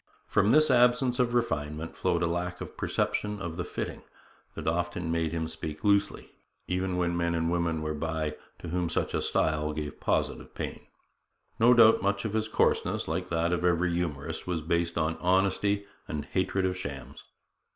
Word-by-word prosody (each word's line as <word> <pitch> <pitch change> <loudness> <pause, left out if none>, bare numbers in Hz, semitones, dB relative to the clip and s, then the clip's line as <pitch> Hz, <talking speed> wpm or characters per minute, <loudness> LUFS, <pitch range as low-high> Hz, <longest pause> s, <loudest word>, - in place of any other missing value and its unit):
From 105 - +3
this 155 -2 +5
absence 125 0 +4
of 120 -1 +2
refinement 80 -8 -1
flowed 85 +1 0
a - - +3
lack 90 +1 -2
of - - -8
perception 105 0 -1
of 85 -3 -5
the 90 - -2
fitting - - -5 0.5
that - - -6
often 85 0 -1
made 80 -1 0
him 80 -1 -2
speak 80 -1 -6
loosely, 100 0 +1 0.4
even 90 0 -1
when 85 -1 0
men 85 0 0
and 80 0 0
women 85 -2 0
were 75 0 -2
by 80 -1 -2 0.2
to 85 - -8
whom 90 0 -1
such - - -1
a - - 0
style 75 -1 0
gave 75 -1 -5
positive - - -1
pain. - - -6 0.7
No 120 +2 +6
doubt 115 -1 +7
much 100 +3 0
of 110 - -2
his 110 0 0
coarseness, 110 - +1
like - - -2
that 85 +1 +1
of 90 0 -1
every 90 0 +2
humorist, 80 -4 -3
was 85 -3 -2
based 85 +1 0
on 80 0 0
honesty 95 +2 +2 0.2
and 75 -1 -4
hatred 95 0 0
of 90 0 0
shams. 70 -7 -7
85 Hz, 180 wpm, -29 LUFS, 80-100 Hz, 0.7 s, doubt